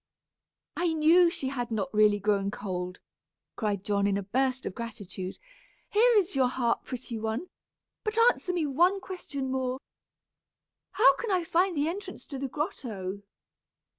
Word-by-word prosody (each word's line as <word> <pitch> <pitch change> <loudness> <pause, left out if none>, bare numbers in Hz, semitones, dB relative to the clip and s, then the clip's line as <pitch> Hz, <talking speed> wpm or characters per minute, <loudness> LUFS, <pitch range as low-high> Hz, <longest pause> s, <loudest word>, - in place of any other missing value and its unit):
"I 345 -2 +1
knew 330 +3 +6
she 270 -5 -3
had 245 -3 -3
not 225 +4 -2
really 210 -1 +5
grown 200 -1 +1
cold," 180 -3 -4 0.6
cried 205 -4 -1
John, 200 -1 +1
in 200 -1 +1
a 200 - -3
burst 260 +5 0
of - - -3
gratitude. 195 -4 -6 0.5
"Here 465 +3 +5
is 385 -5 +1
your 260 -2 +4
harp, 245 -2 0
pretty 240 -3 -5
one, 225 +11 -3 0.5
but 430 +1 -2
answer 460 -5 +4
me 345 -3 0
one 350 +8 +3
question 285 -8 -5
more. 260 0 -1 1.1
How 425 +6 +6
can 465 - -4
I 370 -3 +2
find 350 +1 +1
the 290 +2 +2
entrance 380 +5 -5
to 275 -3 -6
the 275 - -2
grotto?" 220 - -4
260 Hz, 155 wpm, -28 LUFS, 210-345 Hz, 1.1 s, knew